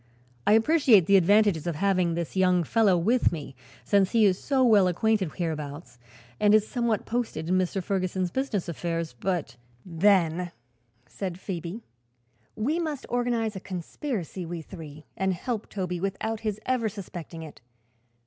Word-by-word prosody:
I - - +6
appreciate 225 - +5
the 200 - +4
advantages 195 -3 +4
of 170 - -1
having 180 -1 +1
this 170 +1 -4
young 180 -2 +3
fellow 200 +1 +3
with 225 +9 +2
me, 150 -5 -6 0.3
since 195 - +2
he 225 -2 +5
is 190 -2 +3
so 270 -2 +1
well 210 -6 +5
acquainted 190 0 +1
hereabouts 150 -6 -5 0.4
and 210 0 +5
is 215 0 +3
somewhat 235 -4 -1
posted 225 -9 -3
in 185 +1 +2
Mr. 185 +1 -1
Ferguson's 185 -1 -1
business 260 -8 -2
affairs; 165 -2 -3
but 170 -11 -2 0.2
" 120 - -35 0.2
"Then," 175 -3 +3 0.5
said 185 +4 -5
Phoebe, 180 +3 -5 0.7
"we 290 +10 0
must 305 -5 -3
organize 240 -3 0
a - - -4
conspiracy, 185 - -5
we 170 -1 -6
three, 155 -4 -10
and 190 -1 0
help 225 +3 -4
Toby 180 -3 -3
without 200 +4 -2
his 215 -2 -3
ever 250 -4 +1
suspecting 175 -5 -8
it. 155 -6 -12
190 Hz, 155 wpm, -27 LUFS, 170-220 Hz, 0.7 s, I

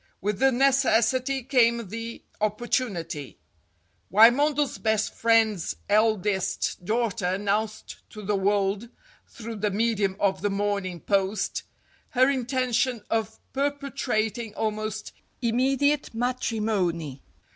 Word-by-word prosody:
With 205 0 -2
the 270 +1 +4
necessity 260 0 +2
came 235 -4 +2
the 230 +2 -6 0.2
op 210 0 0
portunity. 185 - -2 0.8
Wymondel's 275 +7 +4
best 220 -1 0
friend's 225 -6 +2
eldest 205 -4 +1
daughter 225 -1 0
announced 205 +3 -2
to 215 - -10
the 205 +1 0
world, 200 +2 0 0.4
through 230 -1 -8
the 210 +1 0
medium 205 -2 0
of 190 -2 +1
the 205 - +1
"Morning 200 -3 -2
Post," 195 +1 0 0.5
her 260 +2 +4
intention 255 -2 0
of 220 -1 -1 0.2
perpetrating 260 -6 -2
almost 215 0 -3 0.3
immedi 265 +5 +3
ate 280 -5 -7
matrimony. 210 - -1
220 Hz, 105 wpm, -26 LUFS, 200-245 Hz, 0.8 s, the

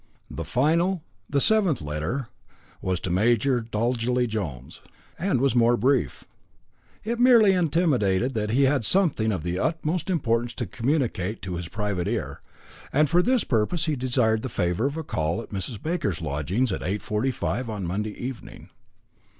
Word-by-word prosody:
The 80 - -4
final, 165 - +1 0.3
the 140 - +2
seventh 195 - +3
letter, 80 - -3 0.5
was 90 -1 -1
to 95 - -3
Major 120 +6 +2
Dolgelly 120 +2 0
Jones, 85 - -5 0.4
and 180 -7 +1
was 135 -1 +2
more 120 0 +4
brief. 125 - +1 0.8
It 235 +2 -2
merely 235 -5 +6
intimated 140 - +1
that 105 -2 -1
he 130 +6 +3
had 135 -2 +2
something 145 - +2
of 95 -7 -3
the 90 +1 -2
utmost 160 +2 -1
importance 120 -8 0
to - - -3
communicate 115 - -1
to 95 -2 -4
his 85 0 -4
private 105 -4 -2
ear, - - -3 0.5
and 150 +1 +2
for 175 +1 +5
this 250 +4 +2
purpose 140 +9 0
he 155 -3 0
desired 120 -4 +1
the 130 - -4
favour 90 +4 0
of 145 +3 -4
a 160 - -3
call 80 - -1
at 115 - -8
Mrs. 100 +2 -4
Baker's 155 - -2
lodgings, 85 - -1
at - - -3
8.45 105 +5 -2
on 105 -4 -4
Monday 105 +5 -3
evening. 125 0 -8
120 Hz, 160 wpm, -25 LUFS, 100-150 Hz, 0.8 s, merely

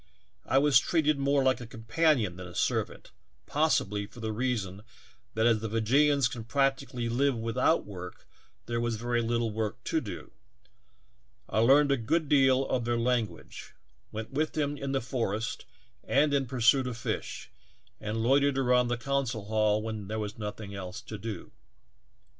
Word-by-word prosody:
I 135 - +3
was 140 -2 +6
treated 155 -1 +1
more 140 0 +2
like 130 -1 +2
a 120 - -7
companion 115 - +1
than 90 0 -8
a 85 - -12
servant, - - -1 0.3
possibly 105 -10 +1
for 120 - -14
the 110 -1 -3
reason 105 -5 -2 0.5
that 110 +1 +2
as 115 -2 +4
the 110 0 -4
Fee 115 +2 0
jeeans 140 +3 +4
can 120 -3 -6
practically 135 -1 0
live 130 +2 +1
without 115 +7 +1
work 90 -3 -9 0.4
there 120 0 -2
was 120 -1 -1
very 120 +2 -1
little 115 0 0
work 110 -1 -3
to - - 0
do; - - -8 1.2
I - - 0
learned 140 +5 +5
a 140 - +3
good 150 +7 0
deal 135 -2 +4
of 125 -2 0
their 120 0 0
language, 120 -2 -2 0.4
went 110 +3 -6
with 155 +3 -1
them 145 -2 -1
in 140 -1 -4
the 135 -1 0
forest 115 -3 -3 0.4
and 145 +2 +2
in 135 -2 +1
pursuit 125 +1 +3
of 120 -2 -4
fish, 115 - -4 0.5
and 110 +1 -3
loitered 140 +2 +3
around 125 -2 +3
the 120 0 -1
council 125 -4 -2
hall 110 0 +1
when 110 -3 -5
there 110 +2 -3
was 105 -1 -4
nothing 105 -1 -6
else 95 +1 -6
to 110 -2 -8
do. 105 -4 -6
120 Hz, 170 wpm, -29 LUFS, 110-135 Hz, 1.2 s, was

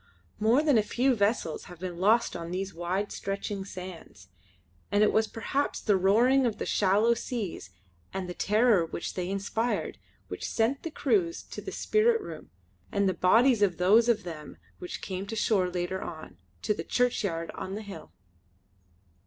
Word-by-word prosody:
More 230 +7 +4
than 290 -7 +4
a - - +4
few 255 +5 +1
vessels 205 -7 0
have 175 -2 -11
been 180 -1 -5
lost 220 +5 +3
on 170 -1 -5
these 190 +2 -3
wide 180 +4 -2
stretching 195 0 -4
sands, 180 - -10 0.6
and 205 +1 +4
it 210 - +3
was 220 0 +3
perhaps 270 +6 -2
the 210 - +2
roaring 230 +8 +4
of 220 - -3
the - - -3
shallow 210 +4 +3
seas 220 - -5 0.4
and 190 -1 -4
the 180 - -5
terror 210 -1 +3
which 165 +1 -5
they 180 -1 -3
inspired 200 +4 -2 0.3
which - - -5
sent 235 +5 +1
the 330 - -4
crews 340 +1 0
to - - -8
the - - -6
spirit 455 +2 +2
room - - -9 0.4
and 200 -1 +1
the 190 - +2
bodies 225 +7 +4
of 190 -4 +2
those 215 +6 +5
of 225 -4 +2
them 155 -4 -8 0.2
which 180 - -7
came 190 +1 -4
to 225 - -4
shore 195 -4 +2
later 180 +1 -3
on, 155 - -8 0.3
to - - +2
the - - -5
churchyard 200 -9 0
on 190 - -5
the 215 - -6
hill. 195 - -10
200 Hz, 175 wpm, -28 LUFS, 180-230 Hz, 0.6 s, those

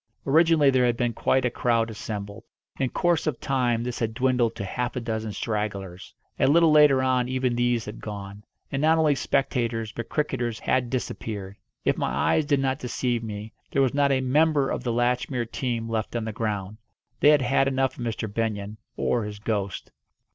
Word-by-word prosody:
Originally 155 -1 +5
there 125 -1 +3
had 120 -1 0
been 120 -1 0
quite 130 +2 +1
a 125 - +1
crowd 115 -2 +1
assembled. 105 0 -6 0.4
In 130 -2 +1
course 170 +1 +1
of 150 - -1
time 125 -4 0
this 125 0 -4
had 115 -1 -2
dwindled 125 -2 +1
to 100 - -4
half 120 +5 -3
a - - -1
dozen 110 -2 -3
stragglers. 100 -4 -4 0.2
A - - +4
little 165 +3 +5
later 145 -3 +6
on 125 -1 +1
even 130 -1 0
these 120 -1 +1
had 105 - -8
gone. 100 -1 -7 0.3
And 135 - -1
not 160 +1 +4
only 155 -2 +4
spectators 120 -5 -1
but 115 0 -6
cricketers 125 -6 -1
had 125 -1 0
disappeared. 105 -6 -4 0.3
If - - +1
my - - 0
eyes 155 - +1
did 145 -2 +2
not 135 0 0
deceive 120 -1 -1
me, 110 -1 -7 0.2
there 135 - +2
was 130 - +1
not 140 0 +3
a 130 -1 +2
member 145 +1 +2
of - - -3
the 120 - -1
Latchmere 120 +1 0
team 120 -3 -2
left 110 0 -3
on 115 -2 -1
the 110 - -3
ground. 105 -2 -3 0.4
They 145 - +6
had 150 -3 +5
had 135 +2 +2
enough 135 -1 0
of - - -4
Mr. 115 -1 -3
Benyon 105 -1 -3 0.2
or 120 -2 0
his 105 0 -6
ghost. 100 -3 -3
120 Hz, 195 wpm, -25 LUFS, 110-135 Hz, 0.4 s, later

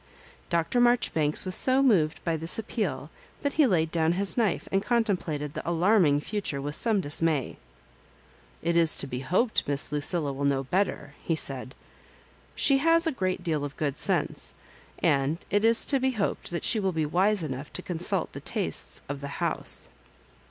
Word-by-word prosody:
Dr. 170 +8 +1
Maijoribanks 180 -12 +2
was 185 - +2
so 260 +6 +5
moved 170 - +2
by 165 -2 0
this 165 +1 +1
appeal 185 - -3 0.3
that 285 - 0
he 305 -3 +4
laid 165 -6 +1
down 165 0 +1
his 195 +2 -1
knife 220 -7 0
and 195 - +2
contemplated 185 - -1
the 165 - -5
alarming 170 -4 +3
future 200 -7 -3
with 145 +1 -4
some 220 -1 +2
dismay. 150 -2 -1 0.5
" - - -30
It 170 +1 0
is 165 -2 +4
to - - -1
be 125 -2 -5
hoped 185 - 0
Miss 140 0 +1
Lucilla 150 0 +1
will 140 +1 -5
know 140 -1 +1
better," 150 -2 -2
he 165 - 0
said. 135 -3 -2 0.4
*' - - -28 0.3
She 275 -1 +3
has 330 +3 +3
a 325 - +1
great 185 -8 -2
deal 155 -4 -1
of 145 -1 -6
good 145 -3 -2
sense, - - -1 0.5
and 140 +3 +2
it 205 +1 +2
is 230 0 +4
to 275 - +2
be 260 0 0
hoped 205 -4 -2
that 170 - -4
she 220 - +4
will 190 -2 -1
be 160 -1 0
wise 190 +5 +2
enough 140 -1 -5
to 185 - -4
consult 175 -1 -2
the - - -8
tastes - - -3
of 140 0 -5
the 140 - -5
house." - - -3
170 Hz, 185 wpm, -27 LUFS, 145-210 Hz, 0.5 s, so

